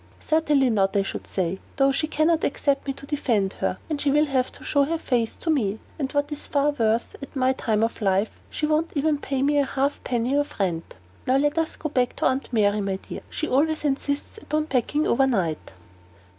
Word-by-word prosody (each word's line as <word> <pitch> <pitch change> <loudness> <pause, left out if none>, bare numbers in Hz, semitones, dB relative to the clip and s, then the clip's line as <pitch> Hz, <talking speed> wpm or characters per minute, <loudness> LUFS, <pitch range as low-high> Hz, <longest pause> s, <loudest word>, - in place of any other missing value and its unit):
"Certainly 300 -5 +2
not, 195 -2 +2
I 200 - +3
should - - -5
say; 185 0 -2 0.2
though 275 0 +4
she 275 +3 0
can 310 0 +1
not 330 -1 +2
expect 280 0 0
me 275 - 0
to 275 - -11
defend 235 -10 0
her, 185 - 0
when 305 -3 -2
she 285 - +1
will 295 +2 +4
not 260 -3 -1
show 285 -1 +3
her 325 +4 0
face 240 -7 0
to 325 - -1
me; 215 -9 +1 0.2
and 270 -2 -2
what 285 +1 0
is 295 - -5
far 290 0 +2
worse, 230 -4 0
at 275 - -9
my 260 0 +3
time 220 -4 0
of 225 0 -2
life, 195 +1 +1
she 305 - -2
won't 310 +2 +1
even 295 0 +1
pay 270 -2 -1
me 290 +1 +3
a - - +4
half 275 +1 -1
penny 245 +1 0
of 290 -4 -1
rent. 170 -4 -2 0.3
Now 260 +1 +4
let 290 +1 +2
us 325 0 -1
go 310 - -4
back 250 -3 0
to - - -1
Aunt 260 +1 0
Mary, 210 -2 +2
my 195 -1 -1
dear; 190 - -8
she 310 - -3
always 305 +4 +1
insists 285 +7 -2
upon 305 -6 -1
packing 295 +2 0
overnight." 210 - +1
275 Hz, 215 wpm, -24 LUFS, 225-295 Hz, 0.3 s, though